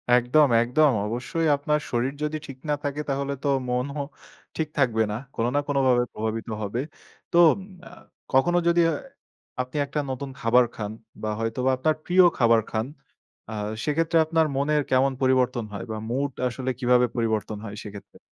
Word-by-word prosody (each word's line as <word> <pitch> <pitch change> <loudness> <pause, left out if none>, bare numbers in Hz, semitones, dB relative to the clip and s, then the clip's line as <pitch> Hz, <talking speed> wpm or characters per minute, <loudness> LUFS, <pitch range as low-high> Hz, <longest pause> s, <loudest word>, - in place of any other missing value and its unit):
একদম, 125 +5 +4
একদম। 135 +5 +3 0.2
অবশ্যই, 125 +8 -2
আপনার 150 +1 0
শরীর 125 +3 0
যদি 150 +1 -1
ঠিক 135 -1 -9
না 150 - +3
থাকে, 145 +1 -2
তাহলে 140 0 -1
তো - - 0 0.2
মনও 135 +4 -1 0.6
ঠিক 160 - 0
থাকবে 120 -6 +3
না। - - -2 0.2
কোনো 115 +1 0
না - - +4
কোনো 145 -1 +1
ভাবে 120 -1 +4
প্রভাবিত 110 +1 -3 0.2
হবে। 105 +4 -3 0.5
তো - - +2 0.5
আ - - -11 0.4
কখনো 175 +7 +4
যদি 170 0 +4
এ - - +1 0.7
আপনি 130 +3 -6
একটা 140 +2 -3
নতুন 135 +1 -4
খাবার 125 0 +4
খান 105 -1 -4 0.3
বা 110 - -2
হয়তোবা 115 +3 0
আপনার 155 +4 +1
প্রিয় 185 +1 +5
খাবার 115 -2 +4
খান, 110 0 -1 0.7
আ - - -5 0.3
সেক্ষেত্রে 165 +2 +1
আপনার 160 0 +2
মনের 150 +2 +2
কেমন 130 +1 +4
পরিবর্তন 130 -2 +2
হয় 100 - -5
বা 110 - -3
মুড 135 +3 -1 0.2
আসলে 130 +1 -4
কিভাবে 125 -1 +4
পরিবর্তন 110 -2 -1
হয় 105 -1 -7
সেক্ষেত্রে? 105 -1 -11
130 Hz, 165 wpm, -25 LUFS, 115-145 Hz, 0.7 s, প্রিয়